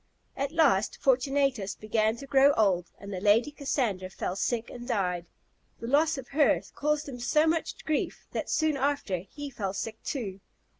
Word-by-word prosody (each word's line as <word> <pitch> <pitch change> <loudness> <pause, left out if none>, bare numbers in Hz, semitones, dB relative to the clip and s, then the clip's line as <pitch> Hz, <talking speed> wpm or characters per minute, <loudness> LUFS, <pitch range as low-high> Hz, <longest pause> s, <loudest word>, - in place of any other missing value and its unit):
At 275 +1 -2
last, 280 -12 +3
Fortunatus 265 -5 +1
began 215 0 +1
to 275 - -9
grow 275 +1 +5
old, 185 -7 +2
and 200 0 -8
the 185 - -4
Lady 220 +8 +4
Cassandra 240 -10 -1
fell 185 -1 -4
sick 230 +3 -1
and 240 -1 -8
died. 180 -7 -1 0.5
The - - -6
loss 295 +5 +3
of 260 -2 -8
her 290 0 +4
caused 300 0 0
him 255 -3 -7
so 300 +6 +3
much 325 0 -1
grief, 310 -2 -1
that - - -3
soon 310 -3 +1
after 270 -9 0
he 280 - -8
fell 200 -5 -3
sick 220 +3 -5
too. 200 -9 -4
245 Hz, 170 wpm, -28 LUFS, 200-285 Hz, 0.5 s, grow